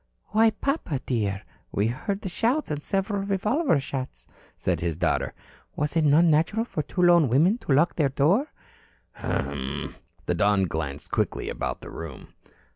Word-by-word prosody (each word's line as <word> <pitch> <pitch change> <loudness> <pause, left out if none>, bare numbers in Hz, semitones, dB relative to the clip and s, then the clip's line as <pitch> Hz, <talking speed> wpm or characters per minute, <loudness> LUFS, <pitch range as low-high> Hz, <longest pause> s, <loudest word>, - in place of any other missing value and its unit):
"Why, 220 +2 +5
papa, 220 - -2
dear, 100 -6 -1 0.3
we 100 - +1
heard 195 - -2
the - - -4
shouts 235 - 0
and 150 0 -3
several 195 +1 -1
revolver 200 - +1
shots," 130 - -6 0.3
said - - 0
his 85 -2 -2
daughter. 90 - 0 0.4
"Was 150 +2 -1
it 165 - +3
not 150 +3 +5
natural 165 +8 +2
for 160 - -3
two 180 +5 -2
lone 170 -5 +6
women 170 - +3
to 145 - 0
lock 150 +6 +3
their 145 -4 +3
door?" 175 - +2 0.6
"Humm!" 70 0 -3 0.3
The - - +1
Don 100 -1 +3
glanced 75 -5 -4
quickly - - -1
about - - -3
the - - -9
room. 80 -5 -9
150 Hz, 160 wpm, -26 LUFS, -, 0.6 s, lone